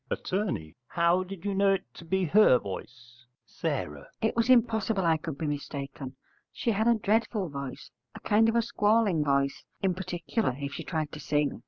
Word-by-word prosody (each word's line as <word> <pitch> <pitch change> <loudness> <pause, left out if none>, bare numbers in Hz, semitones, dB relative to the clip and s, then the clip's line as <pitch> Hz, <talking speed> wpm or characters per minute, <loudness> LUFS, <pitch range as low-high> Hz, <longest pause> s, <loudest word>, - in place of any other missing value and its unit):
Att. - - -4 0.6
How 170 +2 +2
did 185 0 -9
you 200 - 0
know 195 0 +4
it 195 - -1
to 165 - -12
be 190 +3 0
her 180 -6 +6
voice? 120 +4 -9 0.4
S. - - 0 0.3
It 220 - 0
was 235 +2 +1
impossible 225 -5 +3
I 165 -1 +4
could 155 -3 -6
be 160 - -3
mistaken. 140 -2 -5 0.4
She 235 - -1
had 220 +2 +1
a 235 - +5
dreadful 215 -3 0
voice, 140 -2 -7 0.2
a - - -7
kind 220 +2 +3
of 225 - 0
a 235 - +3
squalling 210 -6 +2
voice, 140 -1 0 0.2
in 190 -1 +3
particular 180 - -2
if 140 0 -5
she - - -5
tried 155 -4 -3
to 150 - -8
sing. 145 -1 0
175 Hz, 185 wpm, -28 LUFS, 145-215 Hz, 0.6 s, her